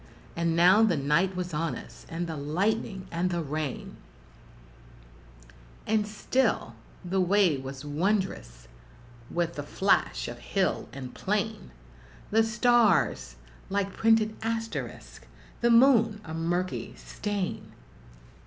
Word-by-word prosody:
And 170 -1 0
now 180 +5 +6
the 205 -8 +3
night 150 +7 +1
was 180 -1 -4
on 155 -3 -1
us, - - -12
and 165 +1 -3
the 165 -1 -5
lightning 190 +7 -1
and 170 +2 0
the 175 -2 -1
rain; 150 -1 -4 1.9
And 215 -1 +1
still 215 - 0 0.3
the 190 +2 +1
way 185 -3 +3
was 135 +1 -8
wondrous 145 - -2 0.6
with 170 0 -1
the 145 - -5
flash 145 - +1
of - - -7
hill - - -1
and 130 -2 -8
plain, 210 +1 -2 0.6
The 220 +2 +5
stars 220 - +2 0.3
like 200 0 -1
printed 225 -1 +3
asterisks 225 0 -5 0.3
the 235 - +3
moon 230 -3 +5
a 160 - -8
murky 175 +3 -2
stain! 205 -3 -4
185 Hz, 115 wpm, -28 LUFS, 155-215 Hz, 1.9 s, now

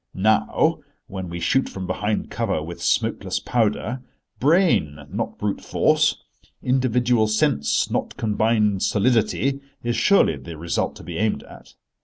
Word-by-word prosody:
Now, 110 - +2 0.3
when 95 -5 -6
we 85 0 -5
shoot 130 +11 +1
from 95 -1 -6
behind 105 +3 -2
cover 75 - -1
with 85 +2 -8
smokeless - - 0
powder, 115 +1 -1 0.4
brain 150 - +3
not - - -3
brute 105 -1 -2
force—individual 125 -3 +1
sense 90 - +1
not - - -2
combined 105 -2 +1
solidity 125 +5 +1 0.2
is 120 0 -1
surely 195 - +4
the 85 -2 -9
result 85 +2 -2
to - - -12
be - - -6
aimed 110 0 0
at. - - -15
110 Hz, 130 wpm, -23 LUFS, 95-125 Hz, 0.4 s, surely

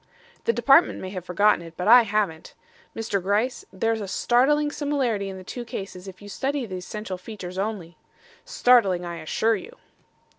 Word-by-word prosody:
The 465 - +4
Department - - +4
may 185 - -6
have 185 -3 -6
forgotten 200 +2 +3
it, 165 -1 -12
but 180 - -3
I 245 +2 +9
haven't. 205 -7 -2 0.4
Mr. 220 -3 -2
Gryce, 210 +7 0
there's 225 +3 -1
a 200 - -5
startling 290 +9 +2
similarity 260 -10 -1
in 190 - -7
the 185 - -10
two 240 +6 -6
cases 195 -4 -7
if 190 +1 -11
you - - -10
study 270 +5 -2
the 190 -4 -6
essential 190 0 -6
features 185 -2 -7
only. 195 -5 -4 0.5
Startling, 200 -8 +3
I 170 -1 -5
assure 220 +8 +1
you." 470 - -9
205 Hz, 175 wpm, -24 LUFS, 185-240 Hz, 0.5 s, I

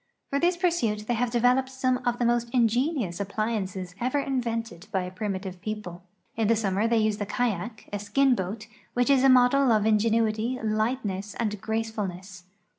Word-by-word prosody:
For 280 - +1
this 345 +2 +2
pursuit 245 - 0
they 240 - +1
have 240 +1 0
developed 250 +2 +2
some 255 -1 0
of 240 0 +1
the 240 - 0
most 235 0 +1
ingenious 240 - +1
ap])liances 200 -3 -3
ever 255 +4 0
invented 230 -9 -2
by 190 -1 0
a 180 - -6
primitive 190 -2 -4
people. 210 -5 -5 0.3
In 225 -2 +1
the 230 - +4
summer 205 0 0
they 230 0 +2
use 215 -1 +1
the 205 -2 -4
kayak, 220 -1 -2
a 205 - -1
skin 255 +7 +3
boat 210 +1 -3 0.3
which 245 +3 +3
is 270 -2 +4
a 270 - +6
model 255 +1 +5
of 215 -2 +3
ingenuity^ 220 +2 +1
lightness, 215 -2 -1
and 210 -4 -2
gracefulness. 200 -5 -4
225 Hz, 175 wpm, -26 LUFS, 205-245 Hz, 0.3 s, a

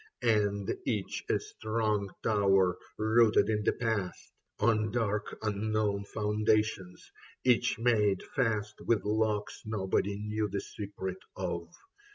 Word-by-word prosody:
And 105 -3 +2
each 105 -5 -2
a - - +3
strong 110 -2 -1
tower 95 -4 +3 0.2
rooted 110 +1 +4
in 105 -1 0
the - - +2
past 110 -6 -2 0.3
On 110 -1 +2
dark 105 -2 -1
unknown 105 -1 0
foundations, 105 -2 0 0.3
each 125 -1 +3
made 105 -5 +2
fast 110 -5 -1
With 110 -5 +2
locks 105 0 0
nobody 100 -1 -1
knew 105 0 -2
the 100 +1 -2
secret 95 -2 -6 0.2
of. 85 -2 -3
105 Hz, 115 wpm, -31 LUFS, 100-110 Hz, 0.3 s, rooted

